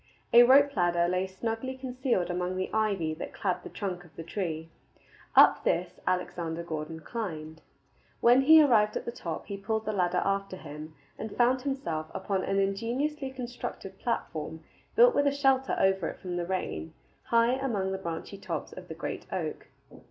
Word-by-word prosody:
A 235 Hz, -, +10 dB
rope 275 Hz, +3 st, +6 dB
ladder 175 Hz, -2 st, +2 dB
lay 185 Hz, +1 st, 0 dB
snugly 225 Hz, +7 st, -4 dB
concealed 250 Hz, -8 st, -1 dB
among 180 Hz, +1 st, -2 dB
the 185 Hz, 0 st, -3 dB
ivy 200 Hz, -7 st, +1 dB
that 155 Hz, -, -7 dB
clad 185 Hz, -3 st, -1 dB
the -, -, -9 dB
trunk 185 Hz, -4 st, -4 dB
of 170 Hz, -2 st, -19 dB
the 165 Hz, -, -7 dB
tree. 165 Hz, -2 st, -3 dB, 0.7 s
Up -, -, +7 dB
this 175 Hz, +1 st, 0 dB
Alexander 170 Hz, -2 st, -1 dB
Gordon 160 Hz, -1 st, -5 dB
climbed. 160 Hz, -7 st, -5 dB, 0.6 s
When 245 Hz, +3 st, +6 dB
he 315 Hz, +3 st, +8 dB
arrived 215 Hz, -6 st, +4 dB
at -, -, -6 dB
the -, -, -3 dB
top 170 Hz, -8 st, -5 dB
he 200 Hz, -, -5 dB
pulled 220 Hz, +2 st, -2 dB
the 215 Hz, -, -1 dB
ladder 180 Hz, -2 st, +1 dB
after 195 Hz, -1 st, -1 dB
him, 155 Hz, -1 st, -9 dB, 0.2 s
and 220 Hz, -1 st, -6 dB
found 250 Hz, +1 st, +3 dB
himself 265 Hz, -, -3 dB
upon 195 Hz, -2 st, -1 dB
an 195 Hz, -, 0 dB
ingeniously 240 Hz, +9 st, -1 dB
constructed 245 Hz, -6 st, -7 dB
platform 160 Hz, -9 st, -3 dB, 0.3 s
built 485 Hz, +1 st, +7 dB
with 285 Hz, -, +3 dB
a -, -, +4 dB
shelter 270 Hz, -2 st, +2 dB
over 190 Hz, -3 st, +2 dB
it -, -, -9 dB
from 180 Hz, -1 st, -5 dB
the 175 Hz, -1 st, -2 dB
rain, 80 Hz, -, -3 dB, 0.3 s
high 230 Hz, 0 st, +4 dB
among 230 Hz, -8 st, -1 dB
the 190 Hz, -, -3 dB
branchy 170 Hz, +2 st, -6 dB
tops -, -, -5 dB
of -, -, -10 dB
the -, -, -7 dB
great -, -, -5 dB
oak. -, -, -4 dB
195 Hz, 175 wpm, -29 LUFS, 175-240 Hz, 0.7 s, A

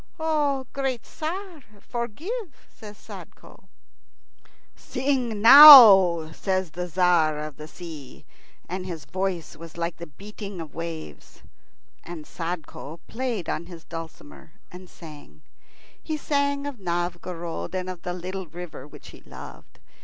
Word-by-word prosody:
"Great 265 Hz, -4 st, -3 dB
Tzar, 350 Hz, +1 st, -6 dB, 0.2 s
forgive," 295 Hz, -, -6 dB
says 210 Hz, -2 st, -13 dB
Sadko. -, -, -14 dB, 1.1 s
"Sing 255 Hz, -5 st, -2 dB
now," 215 Hz, -, +10 dB
says 185 Hz, 0 st, -2 dB
the 180 Hz, +2 st, -5 dB
Tzar 175 Hz, -3 st, +2 dB
of 150 Hz, -2 st, -7 dB
the 155 Hz, -, -9 dB
Sea, 155 Hz, -5 st, -11 dB, 0.4 s
and 185 Hz, +1 st, -5 dB
his 165 Hz, -5 st, -7 dB
voice 185 Hz, -3 st, -4 dB
was 165 Hz, +1 st, -12 dB
like 170 Hz, 0 st, -3 dB
the 170 Hz, -, -9 dB
beating 200 Hz, +4 st, -10 dB
of 160 Hz, -3 st, -9 dB
waves. 165 Hz, -, -9 dB, 0.6 s
And 170 Hz, -3 st, -9 dB
Sadko 165 Hz, -2 st, -7 dB
played 230 Hz, -7 st, -4 dB
on 170 Hz, -, -4 dB
his 170 Hz, -2 st, -12 dB
dulcimer 160 Hz, -2 st, -11 dB, 0.2 s
and 180 Hz, 0 st, -12 dB
sang. 145 Hz, -, -14 dB, 0.6 s
He 310 Hz, -, -4 dB
sang 285 Hz, -1 st, -1 dB
of 285 Hz, -5 st, -6 dB
Novgorod 175 Hz, -1 st, -4 dB
and 185 Hz, 0 st, -3 dB
of 185 Hz, -2 st, -7 dB
the 180 Hz, -, -4 dB
little 185 Hz, +1 st, -6 dB
river 165 Hz, -4 st, -9 dB
Volkhov -, -, -23 dB
which 150 Hz, -, -13 dB
he -, -, -15 dB
loved. -, -, -13 dB
180 Hz, 130 wpm, -24 LUFS, 165-230 Hz, 1.1 s, now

